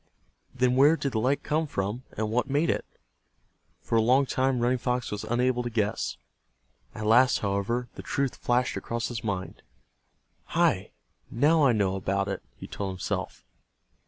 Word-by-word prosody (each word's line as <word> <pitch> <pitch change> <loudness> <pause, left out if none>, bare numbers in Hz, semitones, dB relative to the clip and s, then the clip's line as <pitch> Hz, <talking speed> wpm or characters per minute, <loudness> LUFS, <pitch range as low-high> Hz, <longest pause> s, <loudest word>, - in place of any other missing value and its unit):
Then 125 0 +1
where 145 +5 +6
did 140 - -2
the 110 - 0
light 130 +5 +1
come 155 +1 0
from, 105 0 -3 0.2
and 110 0 -1
what 125 +4 0
made 145 +4 +2
it? - - -3 1.0
For 115 - +1
a - - +4
long 130 +5 +4
time 130 -1 0
Running 125 +1 +1
Fox 125 0 -1
was 105 0 -4
unable 125 +2 +1
to 120 - -3
guess. 110 -3 -1 0.8
At 110 - -5
last, 120 +4 +5
however, 100 +5 -1
the - - -8
truth 140 -2 -2
flashed 125 +1 0
across 115 -1 -3
his 120 -1 -5
mind. 95 -4 -4 1.0
"Hi, - - +2 0.4
now 150 +6 +3
I 130 - +5
know 100 -3 +1
about 100 +1 -1
it," 100 - -3
he - - -9
told 100 -2 -4
himself. 95 - -4
120 Hz, 165 wpm, -27 LUFS, 105-130 Hz, 1.0 s, where